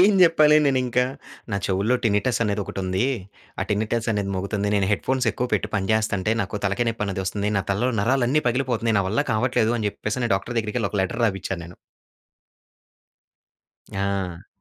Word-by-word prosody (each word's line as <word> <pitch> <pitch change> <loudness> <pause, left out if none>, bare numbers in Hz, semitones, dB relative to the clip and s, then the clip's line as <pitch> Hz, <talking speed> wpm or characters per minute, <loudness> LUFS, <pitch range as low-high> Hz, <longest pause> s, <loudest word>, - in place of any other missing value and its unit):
ఏం 200 +3 +6
చెప్పాలి 155 -3 +6
నేనింకా? 125 -2 +2 0.5
నా 100 - 0
చెవుల్లో 100 +6 +1
టినిటస్ 110 +3 +1
అనేది 105 -1 0
ఒకటుంది. 95 +2 -2 0.6
ఆ! - - +2
టినిటస్ 110 +2 0
అనేది 100 -2 -1
మోగుతోంది. 100 +2 -2
నేను 95 -1 +1
హెడ్‌‌ఫోన్స్ 130 +3 0
ఎక్కువ 125 - -2
పెట్టి 100 - -1
పనిచేస్తుంటే 105 0 +1
నాకు 100 +1 -5
తలకాయ 100 +4 0
నొప్పనేదొస్తుంది. 100 -1 -2
నా - - -1
తలలో 115 +6 +1
నరాలన్నీ 130 +5 +2
పగిలిపోతున్నాయి. 120 -3 0
నా - - -1
వల్ల 110 +8 +1
కావట్లేదు, 115 0 +2
అని 105 -2 0
చెప్పేసి 115 +4 -2
డాక్టర్ 110 +5 -3
దగ్గరికెళ్లి 110 -1 -1
ఒక 105 - -1
లెటర్ 115 +6 -2
రాపిచ్చా 95 -2 -2
నేను. 85 +1 -12 2.2
ఆ! 95 -3 -2
105 Hz, 150 wpm, -23 LUFS, 100-120 Hz, 2.2 s, ఏం